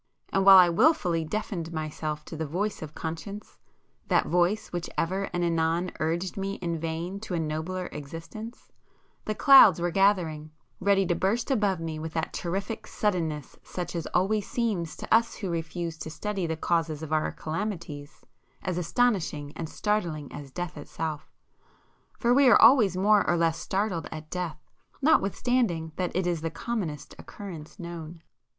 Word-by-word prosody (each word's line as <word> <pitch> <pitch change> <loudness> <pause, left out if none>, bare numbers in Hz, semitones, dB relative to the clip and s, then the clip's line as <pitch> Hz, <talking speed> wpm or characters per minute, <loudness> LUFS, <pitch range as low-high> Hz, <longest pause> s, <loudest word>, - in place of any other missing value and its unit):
And 195 - +3
while 195 -1 +11
I 180 -1 +8
wilfully 175 - +3
deafened 170 -2 -4
myself 155 -1 -4
to - - -8
the 160 0 -3
voice 195 +7 -2
of 155 -1 -8
conscience,—that 170 +6 -4
voice 180 +5 +1
which 175 -1 -3
ever 190 +4 -1
and 175 0 -1
anon 165 +1 +1
urged 170 +5 -1
me 195 0 -2
in 170 -2 -3
vain 165 +4 -4
to 205 -4 -4
a - - 0
nobler 160 +4 -3
existence,—the 190 - -9
clouds 230 - +8
were 175 0 0
gathering, 170 -5 +2 0.3
ready 195 0 +3
to 175 - +1
burst 225 +9 0
above 205 -8 +2
me 160 -1 -4
with 160 0 -6
that 160 - -2
terrific 195 +6 -3
suddenness 165 -8 -2
such 175 -1 -6
as 165 - -3
always 200 +3 0
seems 205 -9 -1
to - - -2
us 230 +1 +4
who 190 -4 -4
refuse 165 0 -4
to 160 - -5
study 195 +2 -3
the 160 0 -2
causes 160 -2 0
of 155 0 -4
our 155 0 +1
calamities, 160 -4 -5 0.4
as 180 -1 -1
astonishing 165 - 0
and 160 -2 -5
startling 170 -10 -2
as 145 -1 -8
death 175 +3 -5
itself. 155 +1 -5 0.9
For 240 +1 +3
we 275 0 +6
are 235 - +7
always 225 -6 +6
more 205 +2 +4
or 175 - +3
less 165 -1 +1
startled 190 -5 -1
at 155 0 -8
death 175 -4 -3 0.4
notwithstanding 230 - +2
that 180 -1 -2
it 185 0 +1
is 175 -3 0
the 165 - -2
commonest 165 - -4
occurrence 175 -6 -9
known. 170 -2 -8
175 Hz, 160 wpm, -27 LUFS, 160-200 Hz, 0.9 s, while